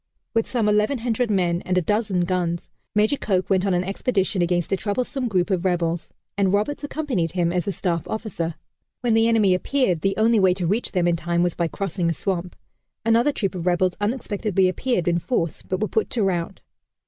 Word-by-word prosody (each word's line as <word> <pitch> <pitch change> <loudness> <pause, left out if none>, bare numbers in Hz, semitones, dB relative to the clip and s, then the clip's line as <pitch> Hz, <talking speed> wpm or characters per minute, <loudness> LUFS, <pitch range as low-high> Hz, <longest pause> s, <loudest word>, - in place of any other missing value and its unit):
With 225 -1 +1
some 235 -4 0
1,100 225 +3 +1
men 175 -4 +1
and 185 0 -1
a - - +4
dozen 205 -1 +1
guns, 175 -1 -1 0.2
Major 215 +7 +3
Coke 190 -5 -1
went 190 +1 +3
on 190 - +2
an 175 - +1
expedition 195 0 0
against 175 -1 0
a - - +4
troublesome 250 +6 -2
group 190 -2 0
of 180 -2 +1
rebels, 175 -2 0 0.3
and 195 -2 +2
Roberts 215 +10 0
accompanied 275 - -2
him 175 -2 +1
as 180 0 -1
a - - +1
staff 170 -4 -2
officer. 200 -7 -3 0.5
When 240 -2 +2
the 225 0 +4
enemy 215 -5 +4
appeared 185 - +1
the 195 0 0
only 225 +1 +4
way 185 -2 +4
to 185 -2 -2
reach 210 +8 -1
them 180 -2 +2
in 170 -1 +2
time 170 +1 0
was 175 -2 +1
by 170 - 0
crossing 180 -1 -2
a - - +1
swamp. 180 +1 -3 0.5
Another 230 +5 +4
troop 200 -8 -2
of 180 -1 -4
rebels 180 +1 +2
unexpectedly 205 -4 0
appeared 185 -1 -1
in 170 0 +2
force, 170 - -2
but 185 - -3
were 215 - 0
put 220 - 0
to 230 - 0
rout. 185 -1 -1
190 Hz, 205 wpm, -23 LUFS, 175-220 Hz, 0.5 s, a